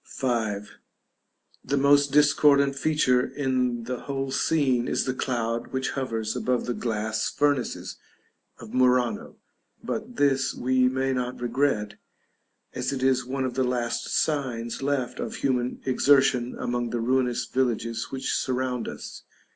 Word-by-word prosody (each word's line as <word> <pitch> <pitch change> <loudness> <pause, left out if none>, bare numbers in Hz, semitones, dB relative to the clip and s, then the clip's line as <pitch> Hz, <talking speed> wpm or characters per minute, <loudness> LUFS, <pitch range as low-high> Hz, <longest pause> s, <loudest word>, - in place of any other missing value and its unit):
§ 115 -6 0
V. - - -16 1.0
The 140 +2 -1
most 140 0 +4
discordant 140 -1 +4
feature 140 -4 +2
in 125 -4 -1
the 125 +1 -4
whole 135 -1 -4
scene 130 -5 +1
is - - 0
the 130 - -1
cloud 115 -3 -2
which 130 0 -2
hovers 115 -5 -3
above 125 -1 0
the 125 - -1
glass 110 -2 -2
furnaces 145 -4 -1 0.6
of 115 -2 -11
Murano; 125 -3 +2 0.5
but 230 +3 -4
this 135 -5 +2
we 130 0 +2
may 130 +1 0
not 125 0 -3
regret, 120 -4 -1 0.7
as - - -2
it 135 -2 -3
is 130 -1 +2
one 130 +1 -2
of 130 - -3
the 130 - +1
last 125 -2 -1
signs 125 -7 -1
left 135 -3 -1
of - - -4
human 125 -2 -1
exertion 130 -2 +3
among 120 -1 -2
the 120 - -2
ruinous 125 0 +1
villages 115 -3 -1
which 135 0 -3
surround 125 -1 -1
us. - - -8
130 Hz, 140 wpm, -26 LUFS, 120-135 Hz, 1.0 s, most